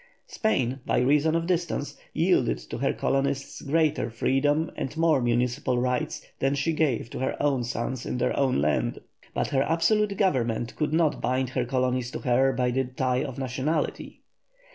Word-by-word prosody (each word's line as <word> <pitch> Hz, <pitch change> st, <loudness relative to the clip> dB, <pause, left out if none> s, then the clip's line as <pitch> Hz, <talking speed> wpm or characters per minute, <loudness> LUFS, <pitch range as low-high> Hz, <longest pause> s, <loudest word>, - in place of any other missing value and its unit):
Spain, 135 Hz, -, 0 dB
by -, -, 0 dB
reason 150 Hz, +5 st, +3 dB
of 165 Hz, 0 st, 0 dB
distance, 175 Hz, -1 st, -1 dB, 0.2 s
yielded -, -, +2 dB
to -, -, -8 dB
her -, -, +1 dB
colonists 135 Hz, 0 st, -1 dB
greater 155 Hz, -4 st, +1 dB
freedom 145 Hz, +7 st, +1 dB
and 135 Hz, +4 st, -4 dB
more 160 Hz, -4 st, +3 dB
municipal 125 Hz, +2 st, 0 dB
rights 125 Hz, 0 st, -1 dB
than 135 Hz, +1 st, +1 dB
she 140 Hz, +4 st, 0 dB
gave 150 Hz, -8 st, 0 dB
to -, -, -5 dB
her 130 Hz, -, -1 dB
own 140 Hz, -4 st, +1 dB
sons 120 Hz, +1 st, -3 dB
in -, -, -3 dB
their 125 Hz, +1 st, 0 dB
own 135 Hz, -, +2 dB
land, 75 Hz, +1 st, 0 dB, 0.4 s
but -, -, 0 dB
her 135 Hz, -, +2 dB
absolute 200 Hz, +7 st, +2 dB
government 120 Hz, -, 0 dB
could 150 Hz, -1 st, -1 dB
not 160 Hz, -1 st, +2 dB
bind 130 Hz, +1 st, 0 dB
her 130 Hz, -1 st, -1 dB
colonies 125 Hz, -1 st, 0 dB
to -, -, -5 dB
her 130 Hz, +2 st, +3 dB
by 125 Hz, -1 st, 0 dB
the 130 Hz, +1 st, 0 dB
tie 125 Hz, 0 st, -1 dB
of 135 Hz, -3 st, -6 dB
nationality. 135 Hz, +4 st, -2 dB
135 Hz, 170 wpm, -26 LUFS, 125-150 Hz, 0.4 s, reason